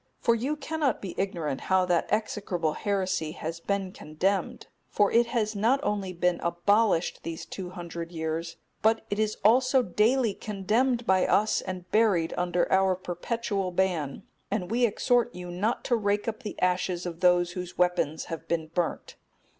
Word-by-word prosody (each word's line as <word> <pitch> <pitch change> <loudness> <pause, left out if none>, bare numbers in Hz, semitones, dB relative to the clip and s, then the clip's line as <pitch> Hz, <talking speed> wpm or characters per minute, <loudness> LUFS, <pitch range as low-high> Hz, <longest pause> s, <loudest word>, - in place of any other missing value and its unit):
For 235 - +3
you 255 +6 -1
cannot 300 -3 -1
be 190 -3 -6
ignorant 165 -8 -2
how 190 -1 +2
that 175 -2 +1
execrable 195 -6 -1
heresy 185 -6 -1
has 165 -1 -5
been 195 +1 -2
condemned; 185 +3 -2 0.2
for 205 -1 +2
it 235 0 +4
has 220 -3 -1
not 230 +7 +3
only 200 -6 -1
been 180 0 0
abolished 180 +2 +2
these 165 -1 -6
two 185 -2 -6
hundred 170 -2 -7
years, 165 0 -3 0.2
but 225 +1 +2
it 205 - -1
is 215 0 0
also 255 +3 +5
daily 225 +3 +2
condemned 225 +6 0
by 190 -2 +3
us 215 +1 +2
and 185 -1 -6
buried 205 -7 +3
under 175 0 +1
our 190 -1 +4
perpetual 195 +2 -3
ban; 175 -6 -1 0.3
and 200 -2 -2
we 240 +1 +3
exhort 240 +3 +1
you 180 -1 -7
not 205 +7 -1
to 245 - +2
rake 205 -1 0
up 225 +1 -3
the 215 - -7
ashes 180 -1 0
of 170 -2 -5
those 180 -1 +4
whose 180 0 -6
weapons 175 -3 +1
have 165 0 -7
been 160 -2 -1
burnt. 175 -2 -2
190 Hz, 165 wpm, -27 LUFS, 175-220 Hz, 0.3 s, also